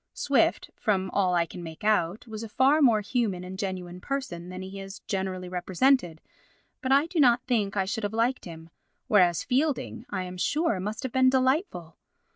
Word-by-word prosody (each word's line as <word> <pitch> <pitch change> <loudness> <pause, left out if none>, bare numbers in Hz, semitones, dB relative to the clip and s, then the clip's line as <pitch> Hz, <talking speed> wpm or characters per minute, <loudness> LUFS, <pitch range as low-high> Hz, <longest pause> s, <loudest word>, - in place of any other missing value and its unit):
Swift, - - +1
from 190 -3 0
all 185 -3 +2
I 170 -1 +2
can 175 - -9
make 160 +1 -9
out, 205 -2 +1
was 220 -2 -7
a 225 - -6
far 275 +7 +3
more 230 -6 +5
human 205 -4 -1
and 185 +1 -8
genuine 180 -2 -5
person 180 -11 -4
than 185 +1 -7
he 190 +1 -8
is 195 0 -8
generally 190 -2 -3
represented, 180 - +1 0.6
but 260 -2 -2
I 280 +3 +5
do 335 0 -3
not 245 -3 +5
think 210 -5 0
I 195 - +2
should 210 +3 -3
have 205 - -1
liked 230 +4 0
him, 165 -1 -10 0.4
whereas 180 -5 +4
Fielding, 260 -3 -1
I 190 -2 -3
am 180 0 -7
sure, 295 - +1
must 210 +3 -4
have 260 - -3
been 260 +1 +4
delightful. 260 - 0
205 Hz, 190 wpm, -27 LUFS, 180-255 Hz, 0.6 s, more